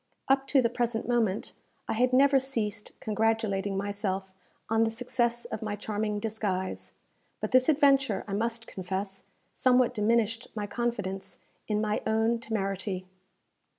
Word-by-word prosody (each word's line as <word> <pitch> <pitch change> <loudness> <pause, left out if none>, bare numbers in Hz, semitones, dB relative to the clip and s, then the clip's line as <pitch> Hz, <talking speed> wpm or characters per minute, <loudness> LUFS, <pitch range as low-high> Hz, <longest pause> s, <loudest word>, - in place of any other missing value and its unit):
Up 270 0 +3
to 270 -2 +4
the - - +5
present 240 -2 -1
moment 225 -5 +1 0.3
I - - 0
had 250 +3 +2
never 270 +1 +6
ceased 230 -5 -3
congratulating 215 -3 0
myself 195 -1 -2 0.3
on 225 0 +3
the 225 - +2
success 240 0 0
of - - -5
my 210 -2 -2
charming 210 0 -2
disguise; 205 -3 -3 0.5
but - - -3
this 255 +1 +5
adventure, 275 -8 +4
I 200 - -4
must 230 +2 -1
confess, 190 +1 -5 0.3
somewhat 250 -1 +3
diminished 230 +1 +1
my 210 -1 -2
confidence 205 -4 -3 0.3
in 210 -1 +1
my 215 -1 0
own 225 +1 +2
temerity. 195 -4 -2
220 Hz, 140 wpm, -29 LUFS, 205-240 Hz, 0.5 s, never